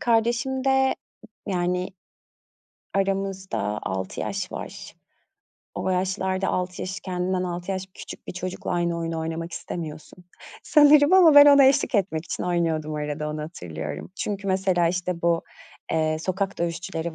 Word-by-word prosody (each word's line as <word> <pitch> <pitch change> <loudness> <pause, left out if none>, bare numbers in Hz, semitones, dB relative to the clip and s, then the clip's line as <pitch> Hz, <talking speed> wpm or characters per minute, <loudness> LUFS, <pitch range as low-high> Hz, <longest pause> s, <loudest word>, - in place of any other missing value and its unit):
kardeşimde, 260 +3 +2 0.5
yani, 180 -1 -1 1.1
aramızda 195 - -1
6 95 0 -4
yaş - - -3
var. - - -8 0.8
O - - -2
yaşlarda 190 +1 0
6 180 0 -2
yaş, 190 +2 -5
kendinden 185 0 -2
6 175 +1 -4
yaş 190 -1 -2
küçük - - -10
bir - - -5
çocukla 185 0 -5
aynı 170 -1 0
oyunu 165 -1 -3
oynamak 165 +1 -4
istemiyorsun 160 +1 -7 0.4
sanırım, 295 +1 +6
ama 355 -5 +7
ben 290 0 +10
ona 280 -1 +8
eşlik 270 0 +3
etmek 175 -6 0
için - - -4
oynuyordum 165 -3 0
arada 150 0 -3
onu 150 0 -4
hatırlıyorum. 80 - -7
Çünkü, 200 -1 -3
mesela, 185 -2 +2
işte, 180 0 -2
bu, 170 -1 +2 0.5
eee, 155 -1 +1
sokak 190 +3 -2
dövüşçüleri 170 -1 -3
180 Hz, 135 wpm, -25 LUFS, 165-195 Hz, 1.1 s, ben